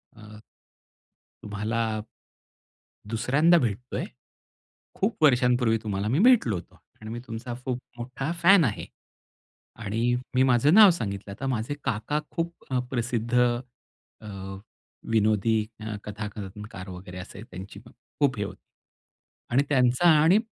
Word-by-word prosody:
अ. 105 0 -13 1.0
"तुम्हाला 105 +2 -3 1.3
2ऱ्यांदा 135 +10 +3
भेटतोय. 120 +2 -3 0.9
खूप 200 -3 -2
वर्षांपूर्वी 125 -4 +4
तुम्हाला 100 -1 -2
मी 130 +6 +1
भेटलो 215 - +4
होतो. 85 - -10 0.2
आणि 110 0 -8
मी 120 - -4
तुमचा 115 +1 -6
खूप 125 -2 -2 0.2
मोठा 130 +4 -4
फॅन 190 -1 +7
आहे." 105 -5 -2 1.0
आणि 115 +4 0 0.2
मी 130 - +4
माझं 130 +5 +4
नाव 210 -2 +9
सांगितलं. 100 - -4
आता 135 +7 -5
माझे 125 +1 -2
काका 125 +5 -1
खूप 170 0 -4
अ, 130 - +1
प्रसिद्ध 120 -1 -2 0.9
अ, 110 - -12 0.8
विनोदी 110 0 +2 0.2
अ, 110 0 -5
कथा 105 0 -5
कनकार 100 -1 -8
वगैरे 90 0 -9
असे 95 +2 -9
त्यांची 95 +2 -9 0.4
खूप 140 -4 +3
हे 100 - 0
होती. - - -9 0.9
आणि 130 +4 +4
त्यांचा 130 +4 +3
आणि 175 +7 +6
115 Hz, 125 wpm, -26 LUFS, 105-130 Hz, 1.3 s, नाव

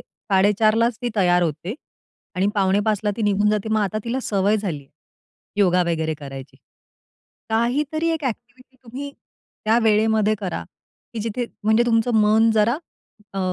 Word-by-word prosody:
4:30 210 +2 +1
लाच 230 0 +1
ती 245 - 0
तयार 180 -2 +3
होते 165 - -3 0.6
आणि 185 +2 +1
पावणे 195 0 +2
5:00 210 -2 +1
ला 210 - +2
ती 225 - -3
निघून 205 0 +2
जाते. 210 0 -1
मग 215 - +2
आता 215 +2 -1
तिला 250 +3 -2
सवय 205 +1 +1
झालीये, 160 -10 -5 0.7
योगा 180 -2 +4
वगैरे 160 -1 -1
करायची. 135 -2 -9 0.9
काहीतरी 285 +8 0
एक 320 -3 -2
एक्टिव्हिटी 255 +2 -7
तुम्ही 270 +5 -7 0.5
त्या 225 +2 +3
वेळेमध्ये 215 0 +3
करा 175 - -4 0.5
की 220 - -3
जिथे 230 +2 -3 0.2
म्हणजे 220 +2 +4
तुमचं 230 0 +2
मन 220 +2 +4
जरा 220 +5 +3 0.6
अ, - - -3
215 Hz, 150 wpm, -22 LUFS, 195-230 Hz, 0.9 s, योगा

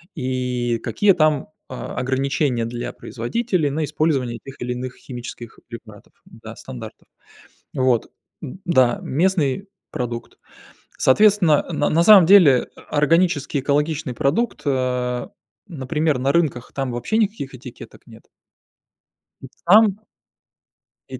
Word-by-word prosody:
и 125 -4 -2
какие 195 - +3
там, 155 +1 +1 0.2
а, 125 -1 -7
ограничения 130 -1 0
для 120 +1 -5
производителей 165 - -2
на 155 +3 -2
использование 140 -6 -1
тех 135 -1 -12
или 125 - -3
иных 125 +1 -6
химических 120 -2 -9
препаратов, 110 -3 -12
да, - - -12
стандартов. 60 - -10 0.7
Вот. 130 -3 +1 0.3
М, 180 - -8
да, 130 -9 +3
местный 180 +2 0 0.2
продукт. 120 -1 -5 0.6
Соответственно, 180 0 +4
на 155 - 0
на 165 +2 +3
самом 195 -2 +8
деле, 170 -10 +6
э, - - -13
органический 150 -2 +1
экологичный 150 0 -1
продукт, 195 - 0
а, 125 -2 -1 0.4
например 150 -2 -1
на 135 +2 +1
рынках, 145 -7 -1
там 135 -2 -2
вообще 120 - -2
никаких 205 -12 -1
этикеток 125 -1 -12
нет. - - -16 1.2
И - - -9 0.2
там 205 +2 +5 1.1
И - - -7
140 Hz, 120 wpm, -21 LUFS, 125-165 Hz, 1.2 s, самом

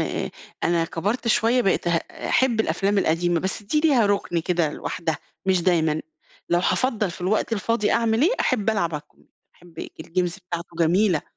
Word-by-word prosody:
أ - - -2 0.3
أنا 170 -1 +2
كبرت 205 +9 -2
شوية 235 +3 +3
بقيت 190 -2 +1
هأ 170 -1 -2
أحب 240 -4 +3
الأفلام 200 -1 +1
القديمة، 170 -1 +1
بس 190 +3 -3
دي 300 +9 0
ليها 270 -9 +4
رُكن 200 -4 0
كده 165 -3 0
لوحدها 160 -2 -3 0.3
مش 185 -2 +2
دايمًا. 160 -4 +2 0.5
لو 175 - +3
هافضّل 215 0 0
في 170 - -10
الوقت 210 +5 0
الفاضي 210 0 +1
أعمل 230 +2 +2
إيه، 365 - +4
أحب 210 +1 +1
ألعب 170 -6 0
على 150 - -4
الكم 150 - -29 0.3
أحب 170 -2 -18
الج - - -5
الجيمز 175 +2 -2
بتاعته 170 -2 -7
جميلة. 175 +1 +3
185 Hz, 175 wpm, -23 LUFS, 170-220 Hz, 0.5 s, ليها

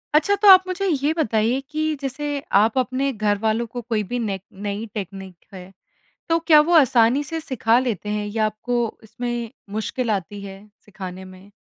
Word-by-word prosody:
अच्छा 365 +7 +4
तो 420 - +5
आप 375 -1 +10
मुझे 385 +1 -2
ये 290 -3 +1
बताइए 230 -3 +1
कि 310 +1 -2 0.2
जैसे 285 +2 -3 0.2
आप 220 +5 +3
अपने 260 +2 0
घर 210 -2 0
वालों 220 +2 +1
को 240 +2 -6
कोई 225 -2 -1
भी 245 - -1
नेक 200 -5 -3
नई 205 +2 -4
टेकनीक 195 -2 -7 0.2
है, 185 0 -10 0.6
तो 330 - +3
क्या 305 -3 +8
वो 320 +4 +1
आसानी 255 -2 +4
से 325 +3 -4
सिखा 245 -5 +1
लेते 225 -6 -2
हैं? 210 0 -2
या 215 +1 0
आपको 230 +2 -2
इसमें 240 +1 -5 0.2
मुश्किल 230 +2 -2
आती 200 0 -3
है 195 -1 -9 0.3
सिखाने 190 -2 -8
में? 185 +2 -14
230 Hz, 180 wpm, -22 LUFS, 205-275 Hz, 0.6 s, आप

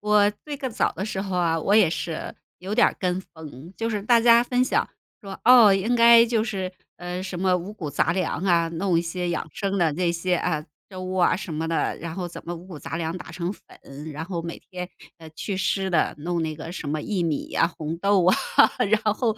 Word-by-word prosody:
我 210 0 +4
最 295 -1 -5
更 265 -3 -4
早 - - 0
的 190 - -4
时 195 -2 -3
候 190 -2 -3
啊， 165 -2 +1
我 195 +6 +1
也 210 -6 +6
是， 165 -1 -4 0.2
有 195 +3 -4
点 - - +5
儿 - - -1
跟 180 -1 0
风， 160 0 -11
就 225 0 -2
是 210 -3 -2
大 235 +1 +4
家 235 0 +6
分 250 0 +1
享 255 - +1 0.4
说： 195 -2 -8
“哦， 235 -4 +8
应 195 +5 +1
该 235 0 +8
就 225 -2 +1
是 190 -5 -3 0.3
呃， 180 +1 -5
什 185 -2 -5
么 185 -1 +3
五 180 +4 -6
谷 165 -8 -6
杂 150 +3 +1
粮 180 0 -2
啊， 170 -3 +3
弄 170 +1 0
一 - - +2
些 175 +1 -3
养 - - -3
生 200 -1 -2
的 165 -2 +3
这 175 +1 0
些， 180 +2 0
啊， 160 -3 -1 0.3
粥 185 0 -6
啊， 180 - +3
什 195 -3 -6
么 160 +1 -2
的， 165 0 -1
然 165 0 -6
后 180 -1 -4
怎 170 - -10
么 175 +1 -4
五 170 +2 -11
谷 175 -5 -9
杂 160 - -6
粮 165 +1 -3
打 180 - -9
成 170 +1 -3
粉， 150 -6 -11
然 155 - -6
后 170 -1 -4
每 170 0 -6
天， 180 -1 -5 0.3
呃， 160 -2 -13
去 190 +5 -5
湿 190 0 0
的， 170 -4 +1
弄 170 +2 -2
那 155 -1 -3
个 160 +2 -8
什 175 - -6
么 155 - -1
薏 180 -1 -1
米 150 -3 -2
呀， - - +2
红 160 -1 -5
豆 195 0 +2
啊， 185 - +6 0.6
然 220 - +4
后” 230 -1 0
180 Hz, 255 characters per minute, -24 LUFS, 165-205 Hz, 0.6 s, 哦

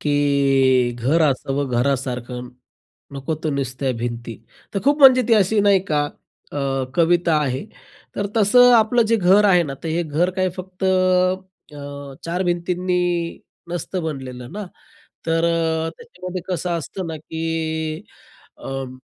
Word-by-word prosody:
की 135 -4 +2
"घर 135 +8 +1
असावं 140 -1 0
घरासारखं, 125 -2 -2 0.6
नकोत 140 +3 -4
तर 155 - +1
नुसत्या 135 -1 -2
भिंती." 120 -1 -4 0.4
तर 195 - 0
खूप 285 +2 +3
म्हणजे 260 -3 +8
ती 230 - +6
अशी 210 0 +3
नाही 200 -2 +4
का 145 -1 +2 0.5
अ, - - -6 0.4
कविता 170 -1 +3
आहे, 130 +2 -2 0.5
तर 200 - -1
तसं 245 +4 +6
आपलं 230 +2 +4
जे 230 - +3
घर 195 +1 +4
आहे 180 -3 +5
ना, 140 -4 -5
तर 165 - -4
हे 165 +2 0
घर 165 +3 0
काय 185 0 +2
फक्त 185 +1 -7
अ, 185 -7 -1
चार 175 +2 -1
भिंतींनी 180 +1 0 0.7
नसतं 175 +1 -3
बनलेलं 130 -5 -6
ना. 210 +1 -5 0.6
तर 165 0 +1 0.5
त्याच्यामध्ये 185 - -7
कसं 180 0 -2
असतं 170 +3 -6
ना 160 - -4
की 160 +1 -7 1.1
अं, 135 -1 -6
165 Hz, 135 wpm, -21 LUFS, 135-185 Hz, 1.1 s, म्हणजे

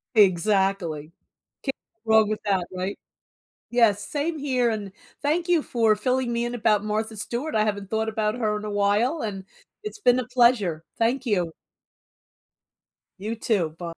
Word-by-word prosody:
Exactly, 190 -5 +2 0.5
can't 270 - -3 0.3
go - - +1
wrong 220 -1 +6
with 215 - -1
that, 190 -3 +1
right 185 +2 -3 0.7
Yes, 215 -4 +3
same 310 +2 -2
here, 255 -4 +1
and 205 -3 -4 0.3
thank 330 +4 0
you 345 -3 +4
for 225 -3 +2
filling 250 +2 0
me 235 0 0
in 240 +1 -3
about 210 -3 +2
Martha 220 +1 -2
Stewart. 240 +8 -4
I 215 - +3
haven't 200 -2 -3
thought 220 0 0
about 215 0 -1
her 215 -3 0
in 210 - -5
a 210 - -4
while, 205 +9 +1
and 195 -3 -4 0.4
it's 425 0 -7
been 255 -9 +4
a 240 - -5
pleasure. 215 -10 +3
Thank 245 +3 +1
you. 180 -6 0 1.7
You 215 +4 -4
too. 205 -7 0
By 170 -1 -5
215 Hz, 165 wpm, -25 LUFS, 200-245 Hz, 1.7 s, wrong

